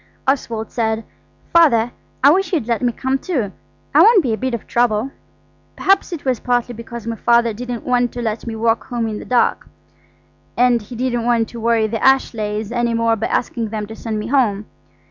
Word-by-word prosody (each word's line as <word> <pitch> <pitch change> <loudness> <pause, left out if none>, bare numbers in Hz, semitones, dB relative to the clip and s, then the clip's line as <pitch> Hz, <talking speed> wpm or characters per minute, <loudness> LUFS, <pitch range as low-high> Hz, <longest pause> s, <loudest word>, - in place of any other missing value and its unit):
Oswald 235 -5 -1
said: 220 -1 -1 0.5
"Father, 245 -9 +5 0.3
I 280 - +8
wish 385 +4 +1
you'd 315 - 0
let 235 +1 -1
me 245 -1 +2
come 260 +3 -1
too. 255 - -2 0.4
I - - +7
won't 435 -5 +6
be 240 -5 0
a - - +1
bit 260 +1 -2
of 230 - -8
trouble." 240 +1 +1 0.6
Perhaps 390 0 +2
it 330 -5 -6
was 255 -4 0
partly 245 -1 0
because 235 0 -8
my 230 0 -3
Father 235 0 +2
didn't 245 +1 -5
want 245 -1 +1
to 245 - -5
let 220 +1 -3
me 225 - -3
walk 225 0 0
home 235 -2 -2
in 215 -1 -4
the - - -9
dark, 250 -1 +1 0.9
and 245 -1 +3
he 220 +4 -10
didn't 240 -1 -1
want 235 -2 +1
to 235 - -8
worry 230 -1 +2
the 220 0 -3
Ashleighs 220 -5 +1
any 240 -1 0
more 230 0 +2
by 220 - -2
asking 230 -2 -2
them 215 -1 -4
to 220 +2 -9
send 225 -1 -4
me 210 - -4
home. 225 -5 +1
235 Hz, 205 wpm, -19 LUFS, 225-250 Hz, 0.9 s, I